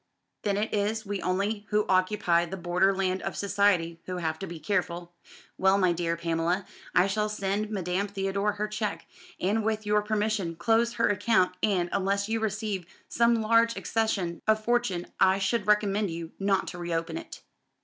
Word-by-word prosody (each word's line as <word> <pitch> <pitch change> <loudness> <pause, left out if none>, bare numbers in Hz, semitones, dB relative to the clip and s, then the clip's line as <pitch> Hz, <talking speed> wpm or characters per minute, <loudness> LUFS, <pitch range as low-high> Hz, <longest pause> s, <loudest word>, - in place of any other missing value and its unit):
Then 200 -1 0
it 215 +2 -1
is 215 +2 0
we 200 -1 -3
only 200 +3 -1
who 210 0 +2
occupy 185 -2 +2
the 190 +3 -6
border 180 +2 +2
land 190 -1 -1
of - - -4
society 190 -4 +1
who 185 0 -3
have 160 -2 -2
to 195 - -5
be 170 -1 -7
careful. 175 -2 -2 0.5
Well, 190 +1 +4
my 185 -3 +3
dear 170 0 -1
Pamela, 170 +3 0 0.3
I 180 - +6
shall 210 +2 0
send 205 0 -2
Madame 190 -1 -1
Theodore 200 +1 -1
her 210 +1 -2
cheque, 210 -6 -3 0.3
and 210 +4 +1
with 215 0 -1
your 210 0 +3
permission 210 -4 -1
close 230 +6 +2
her 230 - +2
account; 205 -2 +2
and, 185 -5 +2
unless 200 +1 0
you 225 +1 0
receive 210 -4 -2 0.2
some 235 0 +3
large 230 +1 +3
accession 195 -7 -1
of 215 0 +2
fortune 240 -8 +1
I 190 0 +5
should 200 +2 0
recommend 210 -1 +2
you 165 0 -6
not 195 -1 +1
to 175 - -8
reopen 165 -1 -2
it." - - -11
200 Hz, 175 wpm, -28 LUFS, 180-210 Hz, 0.5 s, I